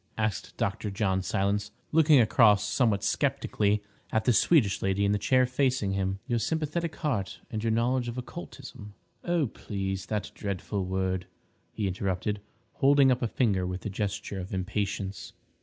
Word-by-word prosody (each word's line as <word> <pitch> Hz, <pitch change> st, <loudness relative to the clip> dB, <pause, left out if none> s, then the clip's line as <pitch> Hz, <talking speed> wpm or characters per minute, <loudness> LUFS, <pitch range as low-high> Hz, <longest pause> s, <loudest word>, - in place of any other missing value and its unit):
asked 105 Hz, -6 st, -2 dB
Dr. 105 Hz, -, -1 dB
John 95 Hz, -1 st, 0 dB
Silence, 100 Hz, +2 st, 0 dB, 0.2 s
looking 155 Hz, -3 st, +6 dB
across 105 Hz, -3 st, +5 dB
somewhat 105 Hz, -3 st, +1 dB
sceptically 105 Hz, 0 st, +1 dB, 0.3 s
at 110 Hz, -1 st, +1 dB
the 125 Hz, -, +4 dB
Swedish 115 Hz, -, +3 dB
lady 95 Hz, +1 st, +1 dB
in 100 Hz, -, +2 dB
the 105 Hz, -, +1 dB
chair 130 Hz, +4 st, +3 dB
facing 125 Hz, -5 st, +1 dB
him. 95 Hz, 0 st, -1 dB
"Your 120 Hz, -1 st, 0 dB
sympathetic 160 Hz, +6 st, -2 dB
heart 110 Hz, -11 st, -2 dB
and 110 Hz, -1 st, -3 dB
your 115 Hz, -, +1 dB
knowledge 120 Hz, +2 st, +1 dB
of 120 Hz, +1 st, -5 dB
occultism—" 125 Hz, -6 st, -9 dB, 0.3 s
"Oh, 175 Hz, -3 st, +1 dB
please—that 100 Hz, -2 st, -4 dB
dreadful 100 Hz, -1 st, -3 dB
word!" 95 Hz, 0 st, -1 dB, 0.4 s
he 105 Hz, -, -2 dB
interrupted, 95 Hz, +2 st, -2 dB, 0.4 s
holding 140 Hz, -1 st, +5 dB
up 125 Hz, -, +1 dB
a 120 Hz, -, +1 dB
finger 100 Hz, -6 st, +1 dB
with 90 Hz, 0 st, -5 dB
a 105 Hz, -, -2 dB
gesture 100 Hz, 0 st, -3 dB
of 95 Hz, +1 st, -5 dB
impatience. 95 Hz, -1 st, -3 dB
105 Hz, 155 wpm, -28 LUFS, 95-125 Hz, 0.4 s, looking